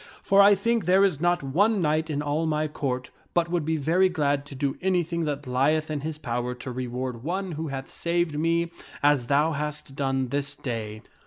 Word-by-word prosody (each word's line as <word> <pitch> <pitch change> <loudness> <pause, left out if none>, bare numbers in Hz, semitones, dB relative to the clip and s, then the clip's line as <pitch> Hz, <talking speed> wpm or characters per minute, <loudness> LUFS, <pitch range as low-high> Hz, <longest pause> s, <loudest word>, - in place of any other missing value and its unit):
For 195 0 +5
I 200 +1 +7
think 230 +2 0
there 190 +3 +5
is 165 -7 0
not 175 -2 +2
one 200 +11 +2
knight 155 -1 +1
in 145 -1 -1
all 150 +3 0
my 155 0 0
Court 130 -4 -3 0.2
but 170 -1 +2
would 175 -3 +1
be 160 +1 0
very 170 +6 +3
glad 145 -4 0
to 140 - -9
do 135 0 -1
anything 175 -3 0
that 145 -1 -3
lieth 150 +5 +1
in 150 - -1
his 155 +1 -4
power 125 -3 -3
to 125 +1 -7
reward 125 -1 -4
one 185 +4 -2
who 160 0 -4
hath 135 -1 -6
saved 170 -2 0
me 165 +1 +1 0.3
as 145 -4 +3
thou 145 +4 +3
hast 150 -2 -4
done 135 -2 0
this 145 +2 -2
day." 110 -5 -5
150 Hz, 200 wpm, -26 LUFS, 135-170 Hz, 0.3 s, I